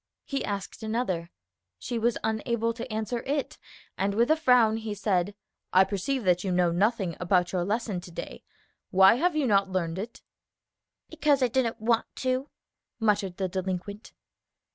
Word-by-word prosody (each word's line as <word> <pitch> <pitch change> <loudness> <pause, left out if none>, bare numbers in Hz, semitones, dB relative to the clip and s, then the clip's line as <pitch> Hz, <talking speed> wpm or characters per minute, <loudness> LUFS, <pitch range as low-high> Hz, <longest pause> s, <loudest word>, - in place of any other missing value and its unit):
He 275 -1 -2
asked 200 +1 -5
another; 215 -7 -2 0.5
she 235 - -3
was 235 +1 +1
unable 230 +1 0
to 230 +1 -7
answer 220 +2 -2
it; 280 0 -3 0.4
and 200 +1 0
with 235 +6 +3
a - - +6
frown 250 -8 +4
he 220 -2 -4
said, 200 -1 0 0.4
"I 185 - +7
perceive 215 +7 -2
that 180 -2 +2
you 190 - -1
know 180 -1 +3
nothing 195 -1 +1
about 180 0 +2
your 180 -2 0
lesson 205 -1 -2
to 175 - -11
day. - - -7 0.5
Why 190 0 +7
have 345 +4 +1
you 300 -3 +1
not 200 -4 +3
learned 180 -2 -2
it?" 225 +4 -7 0.9
"Because 300 -4 +2
I 250 - +3
didn't 240 -2 0
want 225 +1 +1
to," 260 +2 -1 0.5
muttered 205 -5 +1
the 190 - -1
delinquent. 190 +3 -4
215 Hz, 165 wpm, -27 LUFS, 190-240 Hz, 0.9 s, I